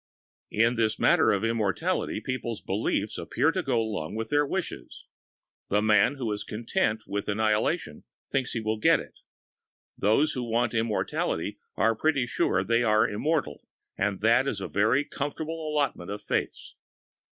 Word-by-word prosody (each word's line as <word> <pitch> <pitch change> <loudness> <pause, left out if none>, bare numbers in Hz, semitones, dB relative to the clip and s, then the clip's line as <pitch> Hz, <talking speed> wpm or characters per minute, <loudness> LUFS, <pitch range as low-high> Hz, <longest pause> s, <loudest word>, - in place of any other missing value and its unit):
In 115 +2 +2
this 110 -1 +1
matter - - +4
of 100 0 0
immortality, 115 -4 0
people's 120 -4 -3
beliefs - - -2
appear - - +1
to - - -1
go 125 -3 0
along 105 -6 -3
with 110 0 -3
their 145 0 +2
wishes. 185 +4 -5 0.6
The 105 - +3
chap 105 +3 +4
who 120 -5 -2
is 105 - -3
content 110 -1 -1
with 100 0 -3
annihilation 110 - 0 0.3
thinks 135 -2 0
he 115 - -2
will 110 0 -2
get - - +5
it; - - -11 0.8
those 110 +10 +2
that 125 - -3
want 120 0 0
immortality 110 -2 -1 0.2
are 115 +4 +3
pretty 145 -3 +1
sure 95 -5 +1
they 115 +4 +2
are 110 -2 +3
immortal, 150 +9 -2 0.3
and 100 -1 -1
that 115 +5 +4
is 110 - -2
a 95 - -4
very 115 +8 +2
comfortable 155 +2 -4
allotment 140 -12 -1
of 105 +1 -5
faiths. - - -3
115 Hz, 155 wpm, -27 LUFS, 105-130 Hz, 0.8 s, get